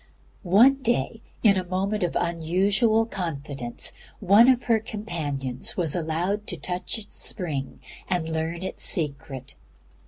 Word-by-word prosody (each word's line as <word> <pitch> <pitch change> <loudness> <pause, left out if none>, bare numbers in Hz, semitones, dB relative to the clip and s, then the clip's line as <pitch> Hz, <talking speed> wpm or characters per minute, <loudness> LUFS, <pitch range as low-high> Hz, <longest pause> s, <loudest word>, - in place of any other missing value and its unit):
One 235 +9 +5
day, 230 -2 0 0.2
in 200 -4 +6
a 185 - 0
moment 190 +4 -1
of 175 -2 -1
unusual 195 +7 +2
confidence, 140 - -3 0.3
one 205 +5 +6
of 255 -1 +3
her 230 -2 +3
companions 155 - -4
was 165 -6 0
allowed 175 +5 -1
to - - -2
touch 180 +5 -3
its 220 - -10
spring 150 -9 -4 0.3
and 175 -3 0
learn 160 +2 -3
its 190 - -2
secret. 140 -4 -1
180 Hz, 130 wpm, -25 LUFS, 160-210 Hz, 0.3 s, in